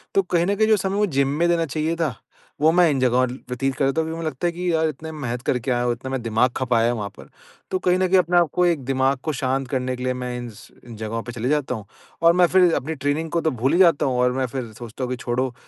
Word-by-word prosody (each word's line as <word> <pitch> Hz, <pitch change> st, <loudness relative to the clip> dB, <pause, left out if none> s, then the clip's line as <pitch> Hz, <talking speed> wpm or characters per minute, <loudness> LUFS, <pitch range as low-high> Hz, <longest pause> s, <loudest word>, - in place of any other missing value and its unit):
तो 195 Hz, -, +5 dB
कहीं 175 Hz, -1 st, +1 dB
न 200 Hz, -, +1 dB
कहीं 215 Hz, +1 st, +2 dB
जो 220 Hz, -1 st, +4 dB
समय 195 Hz, 0 st, -2 dB
वो 210 Hz, -, +3 dB
जिम 140 Hz, -5 st, +1 dB
में 170 Hz, -, +3 dB
देना 170 Hz, -1 st, +2 dB
चाहिए 155 Hz, +2 st, -2 dB
था, 160 Hz, -7 st, -1 dB, 0.5 s
वो 155 Hz, +1 st, +5 dB
मैं 175 Hz, 0 st, +4 dB
इन 135 Hz, -, 0 dB
जगहों 130 Hz, 0 st, +3 dB
व्यतीत 130 Hz, +1 st, -4 dB
कर 140 Hz, -, +1 dB
देता 135 Hz, +4 st, +1 dB
हूँ 160 Hz, -, -3 dB
क्योंकि 160 Hz, -, -4 dB
मुझे 165 Hz, -1 st, -3 dB
लगता 145 Hz, +5 st, -3 dB
है -, -, 0 dB
कि 180 Hz, +1 st, -2 dB
यार 160 Hz, 0 st, +2 dB
इतने 155 Hz, +2 st, -7 dB
मेहनत 125 Hz, -6 st, -4 dB
करके 125 Hz, +1 st, -1 dB
आया 120 Hz, 0 st, +1 dB
हूँ, 120 Hz, -1 st, +1 dB
इतना 130 Hz, +3 st, -7 dB
मैं 130 Hz, -2 st, -2 dB
दिमाग़ 115 Hz, +2 st, +2 dB
खपाया 120 Hz, -3 st, +1 dB
है -, -, +2 dB
वहाँ 105 Hz, -4 st, -4 dB
पर। -, -, -13 dB, 0.4 s
तो 185 Hz, -, 0 dB
कहीं 180 Hz, 0 st, +2 dB
न 185 Hz, -, +2 dB
कहीं 190 Hz, +1 st, +4 dB
अपने 175 Hz, 0 st, +2 dB
आपको 175 Hz, +1 st, +3 dB
एक 165 Hz, -6 st, +1 dB
दिमाग़ 135 Hz, +1 st, +1 dB
को 155 Hz, -, -2 dB
शांत 135 Hz, 0 st, -1 dB
करने 130 Hz, -1 st, -1 dB
के 125 Hz, -, -7 dB
लिए 130 Hz, 0 st, 0 dB
मैं 125 Hz, -1 st, -4 dB
इन्स 120 Hz, -4 st, -9 dB, 0.2 s
इन 115 Hz, -, -9 dB
जगहों 110 Hz, +1 st, -4 dB
पे 120 Hz, -, -7 dB
चले 120 Hz, +1 st, -3 dB
जाता 145 Hz, -4 st, 0 dB
हूँ। 110 Hz, -3 st, -8 dB, 0.4 s
और 170 Hz, 0 st, +6 dB
मैं 180 Hz, 0 st, +4 dB
फिर 180 Hz, -1 st, +4 dB
अपनी 160 Hz, +5 st, -3 dB
ट्रेनिंग 145 Hz, +3 st, -1 dB
को 170 Hz, -, 0 dB
तो 160 Hz, -, +1 dB
भूल 130 Hz, +4 st, 0 dB
ही 175 Hz, -, +3 dB
जाता 170 Hz, -6 st, +5 dB
हूँ 130 Hz, -2 st, 0 dB
और 125 Hz, 0 st, +3 dB
मैं 130 Hz, 0 st, 0 dB
फिर 125 Hz, -2 st, -5 dB
सोचता 115 Hz, +3 st, -8 dB
हूँ 125 Hz, -, -3 dB
कि 125 Hz, -, -2 dB
छोड़ो, 125 Hz, +1 st, -1 dB
135 Hz, 295 wpm, -22 LUFS, 125-165 Hz, 0.5 s, और